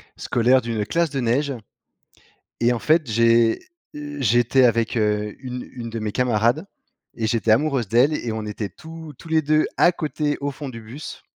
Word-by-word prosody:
scolaire 125 +2 +2
d'une 115 -3 -2
classe 170 +4 0
de 135 -1 -3
neige 135 +5 +1 1.1
et, 120 +1 +3
en 120 - -1
fait, 155 +2 +2
j'ai, 115 0 +3 0.3
heu, 145 0 -7
j'étais 120 +2 +3
avec, 115 0 +2
heu, 105 -1 0
une 125 -1 -6
une 120 -3 -7
de 115 - -4
mes 105 -1 -3
camarades 120 - +1 0.5
et 115 - -2
j'étais 115 0 0
amoureuse 130 0 +2
d'elle 125 +8 +3
et 120 -6 -3
on 110 -1 -4
était 105 -2 -4
tous 160 - -10
tous - - -12
les 160 0 +2
2 155 +1 +2
à 175 - +5
côté, 150 -3 -2
au 145 0 -2
fond 140 +1 -7
du 115 - -9
bus. 120 +8 -9
120 Hz, 185 wpm, -22 LUFS, 115-145 Hz, 1.1 s, à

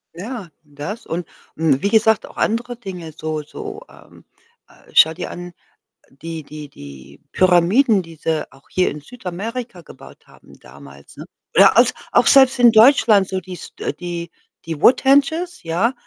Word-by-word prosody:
Ja, 205 0 -7
das. 150 +9 -8
Und 170 0 -5 0.3
und 150 -4 +1
wie 200 - +1
gesagt, 220 0 +3
auch - - -16
andere 240 +2 -1
Dinge 180 -8 -9
so 155 -1 -4
so, 415 - -9
ähm - - -19 0.4
äh, - - -22
schau 160 +1 +6
dir 175 - -6
an, 175 0 -9 0.6
die 160 +3 -8
die 150 0 -10
die 70 - -13
Pyramiden, 190 +5 +3
die 165 -1 -13
sie 160 0 -3
auch 135 - -22
hier 185 - +1
in 150 - -9
Südamerika 220 - -7
gebaut - - -16
haben, - - -20
damals, 70 +1 -16
ne? - - -9 0.3
Oder - - +6
als - - +5 0.2
auch - - +3
selbst 265 -1 +5
in 240 -1 +7
Deutschland 220 -4 +5
so 190 -1 -3
dies 185 0 -11
äh, - - -3
die 175 -1 -6 0.4
die 160 -3 -5
Woodhenges, 285 - +2
ja. 180 +10 0
180 Hz, 160 wpm, -19 LUFS, 160-235 Hz, 0.6 s, in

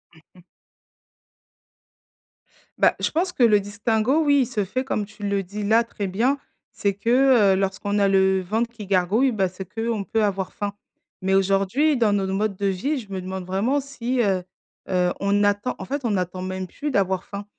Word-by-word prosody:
Mmh 160 - -19
mh. 180 - -17 2.4
Bah, - - +4
je - - 0
pense 355 +4 0
que - - -4
le 215 -3 +6
distinguo, 215 +7 0
oui, 285 -2 +4
il - - +2
se 225 -4 -2
fait 255 +7 -2
comme 215 -6 -2
tu 210 0 -14
le 200 -1 0
dis 200 +3 -6
là 220 +3 +4
très 220 -3 -5
bien, 230 +9 +1 0.3
c'est 200 -1 -1
que, 235 -1 +4
heu, - - +2
lorsqu'on 195 +1 -1
a 200 -1 +3
le 190 -1 +3
ventre 220 +6 -1
qui 225 -3 -9
gargouille, 195 +7 +2
bah, 195 -4 +1
c'est 185 +1 -8
qu'on 225 +1 -2
peut 220 +2 0
avoir 195 -2 -1
faim, 205 -1 -3 0.5
mais 190 +1 +1
aujourd'hui 195 +10 +2
dans 220 -4 +3
nos 195 -1 0
modes 200 +1 -1
de 200 +1 -1
vie, 260 +11 -1
je 210 -5 -12
me 190 - -3
demande 185 0 -5
vraiment 215 +10 +1
si, 255 -2 -2
heu 190 -4 +1 0.5
heu, 180 -1 +2
on 200 +1 +2
attend, 205 +4 +1
en - - -6
fait 275 0 -4
on 230 - +1
n'attend 185 -1 -2
même 185 0 -4
plus 295 +10 -5
d'avoir 190 -5 +1
faim. 200 0 -7
205 Hz, 200 wpm, -23 LUFS, 190-235 Hz, 2.4 s, le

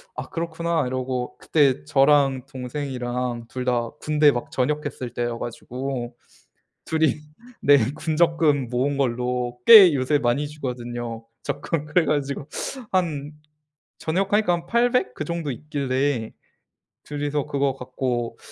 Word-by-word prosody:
'아 - - -6
그렇구나.' 170 -3 -1
이러고 130 -1 -3
그때 140 - +2
저랑 135 - +3
동생이랑 125 -3 -4
2 125 -1 -5
다 120 -2 0
군대 150 -1 +4
막 120 - -4
전역했을 135 -3 -2
때여 120 -1 -2
가지고 125 +1 -5 0.7
2 160 0 0
이 150 -1 +2 0.4
네. 145 0 +6 0.2
군 160 -2 -2
적금 160 -6 +3
모은 130 +3 0
걸로 125 -1 -1
꽤 200 -7 +10
요새 140 +2 +2
많이 140 +2 0
주거든요 120 -5 -5 0.2
적금. 155 -3 -2
그래가지고 150 -4 0 0.4
한 155 -6 -1 0.7
전역하니까 195 +4 +1
한 170 -1 -2
800 235 - +2
그 - - -4
정도 170 -3 -3
있길래 135 -3 -2 0.7
2 145 0 -5
이서 145 -1 -1
그거 140 -2 0
갖고 125 -2 -3
140 Hz, 235 characters per minute, -24 LUFS, 125-150 Hz, 0.7 s, 꽤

